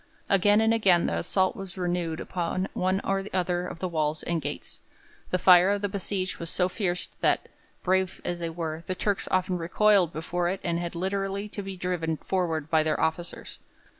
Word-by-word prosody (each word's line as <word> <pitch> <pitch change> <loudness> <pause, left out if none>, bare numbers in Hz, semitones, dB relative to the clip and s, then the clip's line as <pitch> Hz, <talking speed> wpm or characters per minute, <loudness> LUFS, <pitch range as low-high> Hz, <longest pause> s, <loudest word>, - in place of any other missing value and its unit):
Again 205 +2 +5
and 225 0 +4
again 190 -6 +4
the 85 - 0
assault 185 - +1
was 195 -1 -8
renewed 175 -3 -1
upon 185 +1 -2
one 185 +1 +1
or 195 0 -1
other 180 -1 0
of - - -7
the 185 - -2
walls 155 -2 -1
and 170 -1 -1
gates. - - -6 0.5
The 180 - +1
fire 180 +1 +7
of 205 0 0
the 205 - +1
besieged 190 -1 -2
was 170 - -3
so 180 +1 +2
fierce 180 -2 -1
that, - - +2 0.4
brave 190 0 +1
as 175 0 -2
they 170 -1 -2
were, 160 -1 -4
the 185 - -1
Turks 200 +1 -1
often 185 -1 +1
recoiled 190 +1 +3
before 175 +2 -1
it 190 +1 -2
and 170 -1 0
had 175 0 -4
literally 195 +3 -2
to 205 - -5
be 195 -1 -6
driven 175 -3 -1
forward 165 -5 -1
by 160 -1 +3
their 155 0 0
officers. 165 +2 -3
180 Hz, 195 wpm, -27 LUFS, 170-190 Hz, 0.5 s, fire